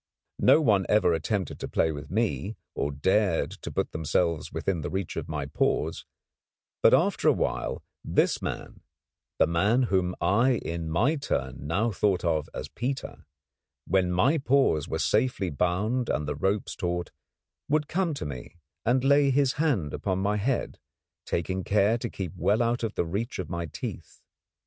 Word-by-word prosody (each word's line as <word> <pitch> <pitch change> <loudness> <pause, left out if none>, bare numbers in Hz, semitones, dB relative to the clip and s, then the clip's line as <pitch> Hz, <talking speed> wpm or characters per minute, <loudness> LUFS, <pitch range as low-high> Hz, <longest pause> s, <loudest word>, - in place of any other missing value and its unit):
No 160 - +6
one 105 - +3
ever 105 -5 +4
attempted 90 +4 -2
to - - -4
play 80 - +1
with 75 -1 -7
me, 110 0 -1 0.2
or 70 - -1
dared 95 +5 +1
to - - -8
put - - -1
themselves 80 +1 0
within 90 -4 -2
reach 95 +4 -3
of - - -4
my - - -2
paws; - - -1 0.7
but - - +6
after - - +3
a - - +8
while - - -2 0.2
this - - +1
man, - - -5 0.6
the - - +5
man 100 +10 +2
whom 95 -5 +1
I 110 +9 +3
in 85 -6 -4
my 120 - +2
turn 65 - -3
now 105 +9 +1
thought 95 -2 +1
of 80 -3 0
as - - -6
Peter, 135 +2 -5 0.6
when 90 0 +2
my 130 - +3
paws 135 - +2
were - - -2
safely 110 -5 +1
bound 105 - 0
and 75 -1 -1
the 75 - -1
ropes 95 +8 -1
taut, 90 -1 -2 0.6
would 150 0 +2
come 175 -3 0
to 140 - -5
me 65 -1 -7 0.3
and 125 +2 +2
lay 140 +1 +5
his 135 -1 +3
hand 105 - +1
upon 95 -2 -1
my 100 +2 0
head, 120 +5 -1 0.5
taking 95 +2 -1
care 105 +4 +2
to 120 - -3
keep 95 -3 -5
well 105 +5 +2
away 115 - +2
out 120 - -2
of 110 - -1 0.2
reach 115 +5 -2
of 90 -3 -5
my 85 -1 -3
teeth. - - -7
100 Hz, 170 wpm, -27 LUFS, 85-120 Hz, 0.7 s, a